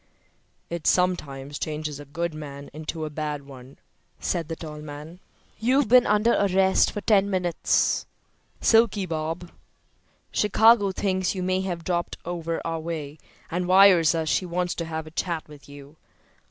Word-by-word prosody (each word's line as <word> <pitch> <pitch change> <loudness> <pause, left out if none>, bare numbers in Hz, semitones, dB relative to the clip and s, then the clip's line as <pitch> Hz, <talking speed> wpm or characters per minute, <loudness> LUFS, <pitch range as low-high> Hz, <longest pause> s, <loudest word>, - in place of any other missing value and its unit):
"It 170 -2 -4
sometimes 145 -6 0
changes 150 -2 -4
a 145 - -9
good 165 +4 -3
man 140 -2 -9
into 155 +1 -5
a 155 - -6
bad 150 -2 -4
one, 130 -1 -13 0.4
said 165 -3 -2
the 165 - -4
tall 155 -2 -8
man. 150 +3 -9 0.4
"You've 255 +4 +2
been 250 +2 +6
under 210 +3 +3
arrest 190 -1 +3
for 205 - -5
ten 200 -2 +3
minutes, 180 -3 +1 0.5
'Silky' 225 -3 +4
Bob. 165 +1 -4 0.8
Chicago 210 0 +4
thinks 190 -1 -1
you 185 - -3
may 185 +1 0
have 175 -3 -4
dropped 175 -1 -2
over 170 -1 -3
our 165 -1 -2
way 155 -2 -6 0.3
and 180 +1 -1
wires 185 -4 +6
us 160 -1 -1
she 155 - +1
wants 180 0 -2
to 170 - -4
have 160 -1 -5
a 155 - -11
chat 170 -1 -3
with 145 -2 -15
you. 140 +2 -13
170 Hz, 155 wpm, -25 LUFS, 155-190 Hz, 0.8 s, been